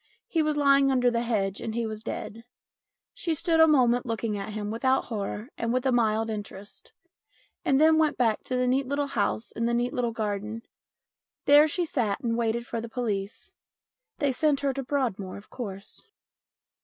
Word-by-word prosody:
He 325 - +1
was 305 -1 0
lying 275 -1 +4
under 250 -2 +3
the 235 0 0
hedge 200 -5 -1
and 225 -1 -4
he 235 -1 -1
was 215 -1 -5
dead. 225 +1 -6 0.7
She 345 -10 -2
stood 335 0 +1
a 320 - +8
moment 245 -5 +4
looking 225 -1 -2
at 200 +1 -5
him 210 -1 -4
without 260 +4 +1
horror 210 +1 -4
and 230 0 -1
with 255 +2 0
a 265 - +3
mild 225 -2 +2
interest, 205 -1 -8 0.7
and 270 - +3
then 315 +1 +5
went 310 -2 +2
back 225 -4 +1
to 255 - -2
the 250 0 +1
neat 260 +1 +1
little 285 +1 0
house 225 -3 -1
in 230 +1 -2
the 235 - +1
neat 245 +2 0
little 250 -4 0
garden. 215 0 -3 0.8
There 290 +2 +7
she 345 +3 -1
sat 235 -10 -1
and 230 -3 -1
waited 235 0 -1
for 230 -1 -4
the 230 - -7
police. 215 -4 -4 0.6
They 285 -2 +1
sent 285 +2 +1
her 280 -1 0
to 275 - -3
Broadmoor, 245 -9 -2
of 200 - -15
course. 200 - -8
235 Hz, 190 wpm, -27 LUFS, 220-275 Hz, 0.8 s, a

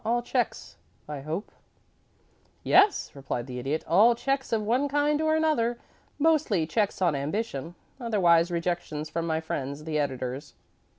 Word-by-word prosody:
All 240 +2 0
checks, - - -2 0.3
I 150 -2 -5
hope?" 155 +8 -5 1.1
"Yes," 400 +1 +4
replied 135 -3 -4
the 125 -1 -6
Idiot. 140 +5 -2
"All 220 +8 +5
checks 270 +2 -2
of 220 -2 +1
one 245 +7 +1
kind 290 +1 +1
or 315 0 +2
another. 245 -7 +1 0.4
Mostly 295 - +2
checks 200 +2 0
on 170 -4 +3
ambition 160 +2 -3 0.2
otherwise, 180 -8 +3
rejections 170 -3 -3
from 170 0 -2
my 160 -1 0
friends 140 -2 -4
the 155 -1 -1
editors." 135 0 -4
175 Hz, 140 wpm, -27 LUFS, 150-240 Hz, 1.1 s, All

